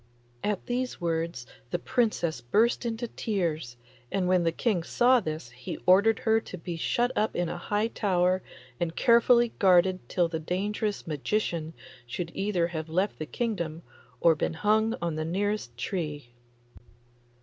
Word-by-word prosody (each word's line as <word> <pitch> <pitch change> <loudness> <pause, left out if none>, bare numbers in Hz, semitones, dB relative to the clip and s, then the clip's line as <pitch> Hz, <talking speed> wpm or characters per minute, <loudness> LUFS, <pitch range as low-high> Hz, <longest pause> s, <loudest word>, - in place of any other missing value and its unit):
At 205 -2 -1
these 250 +1 -2
words 165 -6 -2 0.2
the 175 - 0
Princess 215 -6 0
burst 225 - +2
into 230 +1 -3
tears, 165 - -2 0.3
and 190 -2 0
when 185 -1 +4
the 165 -1 +2
King 195 +1 0
saw 245 +8 +4
this 155 - -5
he 125 0 -7
ordered 200 +5 +5
her 220 0 +4
to 185 - -8
be 170 0 -5
shut 240 +9 +1
up 215 +1 0
in 175 -1 0
a - - -4
high 205 +4 0
tower 185 -4 +1 0.4
and 170 -1 -2
carefully 235 0 +5
guarded 185 -1 +5
till 175 -2 +2
the 165 -1 -3
dangerous 205 +5 -2
magician 165 +1 -2 0.3
should 165 +7 -4
either 195 -4 0
have 160 -2 -5
left 185 +5 0
the 155 - -4
kingdom 170 -9 -3 0.4
or 165 - +5
been 160 +1 -2
hung 215 +5 +2
on 165 -2 -1
the 155 - -1
nearest 190 - -2
tree. 145 -4 -4
180 Hz, 155 wpm, -28 LUFS, 165-215 Hz, 0.4 s, ordered